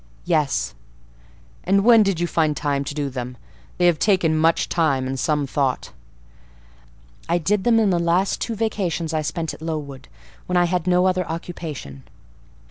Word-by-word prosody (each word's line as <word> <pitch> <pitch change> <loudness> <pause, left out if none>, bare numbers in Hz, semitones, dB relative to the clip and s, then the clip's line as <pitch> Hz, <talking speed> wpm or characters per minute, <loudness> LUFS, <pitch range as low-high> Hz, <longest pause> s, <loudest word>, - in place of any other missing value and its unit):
"Yes." 145 - 0 0.9
"And 195 +2 +2
when 230 0 +7
did 195 -5 +1
you 175 - +1
find 155 -3 0
time 140 -1 -1
to 145 - -5
do 145 -2 -1
them? 125 -2 -6 0.4
They 180 - +2
have 175 -3 +3
taken 180 -6 +2
much 160 +1 +2
time, 145 -6 +1
and 130 0 -3
some 150 -1 0
thought." 135 -1 -1 1.4
"I 170 - +3
did 190 +4 0
them 230 -2 +4
in 210 -3 +3
the 175 - +2
last 175 +3 +1
two 230 - -2
vacations 190 -7 -2
I 155 - 0
spent 160 +1 -3
at - - -12
Lowood, 150 -4 -5 0.4
when 180 - +1
I 175 - +4
had 180 0 -1
no 180 0 +3
other 185 0 +2
occupation." 160 - -6
165 Hz, 170 wpm, -22 LUFS, 145-180 Hz, 1.4 s, when